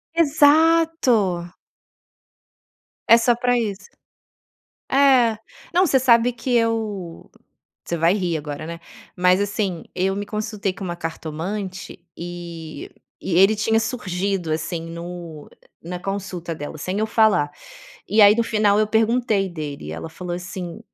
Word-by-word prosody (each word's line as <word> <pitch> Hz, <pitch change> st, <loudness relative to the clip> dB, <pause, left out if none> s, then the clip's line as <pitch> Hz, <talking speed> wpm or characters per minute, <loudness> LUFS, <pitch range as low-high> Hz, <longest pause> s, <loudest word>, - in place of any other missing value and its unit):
Exato! 290 Hz, -, +3 dB, 1.6 s
É 230 Hz, -, +9 dB
só 235 Hz, +1 st, +3 dB
pra 245 Hz, +1 st, +1 dB
isso. 200 Hz, -4 st, -3 dB, 1.0 s
É. 260 Hz, -5 st, +4 dB, 0.3 s
Não, 365 Hz, +2 st, +4 dB
você 270 Hz, -4 st, +3 dB
sabe 245 Hz, -1 st, +4 dB
que 245 Hz, +1 st, -3 dB
eu 215 Hz, -7 st, -2 dB, 0.6 s
você 170 Hz, -, -2 dB
vai 165 Hz, +3 st, +3 dB
rir 180 Hz, -5 st, -1 dB
agora, 150 Hz, +1 st, -6 dB
né. 170 Hz, 0 st, -7 dB, 0.4 s
Mas, 180 Hz, +1 st, +3 dB
assim. 200 Hz, -4 st, -2 dB
Eu 190 Hz, +1 st, 0 dB
me 205 Hz, -, -3 dB
consultei 210 Hz, -2 st, -3 dB
com 190 Hz, -, -8 dB
uma 175 Hz, -1 st, -4 dB
cartomante, 175 Hz, +4 st, -5 dB, 0.2 s
eh, 170 Hz, -3 st, -7 dB, 0.3 s
e 170 Hz, -, -2 dB
ele 195 Hz, +3 st, +6 dB
tinha 220 Hz, +1 st, +2 dB
surgido, 195 Hz, -6 st, -2 dB
assim, 165 Hz, +2 st, -3 dB
no 170 Hz, -2 st, -8 dB, 0.3 s
na 180 Hz, +2 st, -5 dB
consulta 185 Hz, -3 st, -5 dB
dela, 150 Hz, +1 st, -7 dB
sem 185 Hz, +6 st, -3 dB
eu 215 Hz, -, +1 dB
falar. 215 Hz, -10 st, +3 dB, 0.6 s
E 215 Hz, -, +3 dB
aí, 205 Hz, 0 st, +8 dB
no 235 Hz, -, +2 dB
final, 215 Hz, -3 st, +2 dB
eu 215 Hz, -, +3 dB
perguntei 220 Hz, -2 st, +1 dB
dele 150 Hz, -, -6 dB
e -, -, -5 dB
ela 80 Hz, -, -6 dB
falou, 175 Hz, +2 st, -6 dB
assim: 180 Hz, +1 st, -7 dB
195 Hz, 140 wpm, -22 LUFS, 170-225 Hz, 1.6 s, É